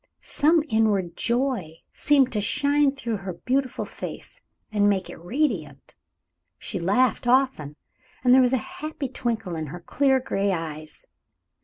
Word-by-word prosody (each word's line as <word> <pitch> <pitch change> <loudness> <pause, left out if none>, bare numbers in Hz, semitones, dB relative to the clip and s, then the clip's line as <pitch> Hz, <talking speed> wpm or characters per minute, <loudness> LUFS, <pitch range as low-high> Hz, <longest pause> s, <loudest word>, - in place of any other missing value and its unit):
Some 315 +2 +2
inward 205 - +1
joy 235 - -1 0.2
seemed 275 -3 +3
to 210 - -1
shine 285 +4 +2
through 235 -5 -3
her 190 -2 -6
beautiful 255 +8 -1
face - - -8 0.3
and 205 -1 +3
make 190 -3 -1
it - - -10
radiant. 180 - -2 0.6
She - - -4
laughed 225 +8 +1
often, 250 - +2 0.5
and 250 -1 +5
there 260 - +7
was 250 -1 +3
a - - +4 0.2
happy 305 -2 -4
twinkle 225 -8 -3
in 160 -1 -4
her 175 +5 -7
clear, 265 +7 +2
gray 200 -5 -1
eyes. 155 -3 -6
230 Hz, 145 wpm, -25 LUFS, 180-265 Hz, 0.6 s, there